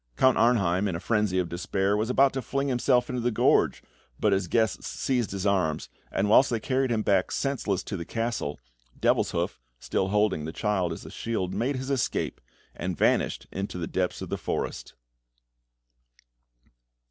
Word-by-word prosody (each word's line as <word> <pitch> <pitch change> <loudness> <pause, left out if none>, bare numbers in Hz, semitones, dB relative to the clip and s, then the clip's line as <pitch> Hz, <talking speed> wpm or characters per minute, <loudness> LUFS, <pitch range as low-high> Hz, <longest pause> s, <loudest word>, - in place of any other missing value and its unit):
Count 130 - +5
Arnheim, 100 -5 +3
in 95 - -2
a - - -3
frenzy 105 -2 +1
of 90 -1 +1
despair, 95 +3 0
was 110 +3 -1
about 135 +2 +4
to 135 - -2
fling 140 +2 -1
himself 125 -1 +2
into 125 -1 -3
the 120 - +1
gorge, 110 - +2 0.4
but 105 -2 +3
his 95 -2 0
guests 110 +1 0
seized 125 -4 -1
his 100 0 -4
arms, 80 -9 +1 0.2
and 100 - 0
whilst 115 +6 +6
they 115 - 0
carried 130 +2 0
him 110 -2 0
back 95 -3 +2
senseless 125 -9 -1
to 100 - -5
the 85 - -4
castle, 115 - -3 0.4
Devilshoof, - - +1 0.2
still 95 - -1
holding 105 -6 +1
the 80 - -4
child 95 -2 0
as 80 - -7
a - - -9
shield, 105 -6 -3
made 135 +4 0
his 130 +2 -4
escape, 135 -3 -1 0.3
and 90 -1 -4
vanished - - +1
into 95 -1 -4
the 85 - -2
depths 90 +2 -2
of - - -7
the - - -3
forest. - - -4
105 Hz, 175 wpm, -27 LUFS, 95-120 Hz, 0.4 s, whilst